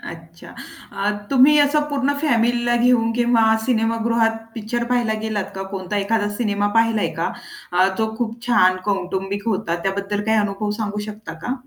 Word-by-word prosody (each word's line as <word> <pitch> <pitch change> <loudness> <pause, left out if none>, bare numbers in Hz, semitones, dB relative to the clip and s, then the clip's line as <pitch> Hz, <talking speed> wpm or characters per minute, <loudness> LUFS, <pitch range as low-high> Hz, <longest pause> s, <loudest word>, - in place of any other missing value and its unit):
अच्छा. 165 0 -11 0.4
अ, 200 +1 -1 0.2
तुम्ही 275 +3 +6
असं 290 +1 +3
पूर्ण 285 -1 0
फॅमिलीला 240 -4 +2
घेऊन 240 -1 +3
किंवा 240 -1 +3 0.2
सिनेमागृहात 230 -1 +1 0.2
पिक्चर 235 +1 -3
पाहायला 235 -2 0
गेलात 215 -3 -2
का? 195 - -4
कोणता 195 +1 -4
एखादा 205 +1 0
सिनेमा 205 -3 0
पाहिला 225 -1 +3 0.2
का? - - -1 0.4
अ, 185 +2 +4
तो 220 0 -1
खूप 230 -1 -3
छान 185 -7 +4
कौटुंबिक 195 +1 -2
होता. 185 -5 -1
त्याबद्दल 200 +2 -2
काही 220 0 +2
अनुभव 205 0 -1
सांगू 210 -1 -3
शकता 210 -4 -8
का? 245 - -2
220 Hz, 155 wpm, -21 LUFS, 200-240 Hz, 0.4 s, तुम्ही